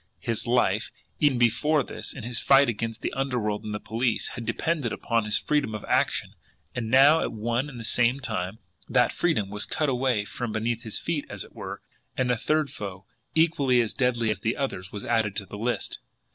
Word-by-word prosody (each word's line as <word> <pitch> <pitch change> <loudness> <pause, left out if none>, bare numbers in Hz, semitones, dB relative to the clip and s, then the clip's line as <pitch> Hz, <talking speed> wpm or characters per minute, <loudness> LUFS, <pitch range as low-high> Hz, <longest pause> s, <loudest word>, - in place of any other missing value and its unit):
His 115 0 -2
life, 115 -4 +2 0.3
even 145 -4 +4
before 135 +6 +3
this, - - -7
in 125 - -8
his 120 0 -1
fight 140 0 +6
against 115 0 -3
the - - -2
underworld 125 -6 -1
and 105 - -5
the 105 - -3
police, 115 +2 -1
had 115 -2 -7
depended 145 +1 0
upon 115 -2 0
his 105 - +2
freedom 145 -8 0
of 105 - -6
action - - +1 0.4
and 115 -3 -3
now, 140 +6 +7
at - - -1
one 120 +5 -1
and 125 -4 -9
the - - -6
same 120 +3 +3
time, 105 -6 -3 0.3
that - - +3
freedom 110 - 0
was 105 0 0
cut 150 -2 0
away 125 -5 +1
from 115 +1 -4
beneath 115 +1 -1
his 110 -2 -3
feet, 160 -4 -2
as 105 -3 -5
it - - -15
were, - - -7 0.3
and 125 -1 +2
a - - +3
third 150 +5 0
foe, 95 -2 -7 0.3
equally 150 -6 +3
as 115 -3 +1
deadly 120 -4 +1
as 100 - -3
the 110 +3 -1
others, 95 -9 -3
was 100 - -6
added 110 -4 +1
to 100 - -2
the 95 - -9
list! 120 +2 -2
120 Hz, 205 wpm, -26 LUFS, 110-135 Hz, 0.4 s, now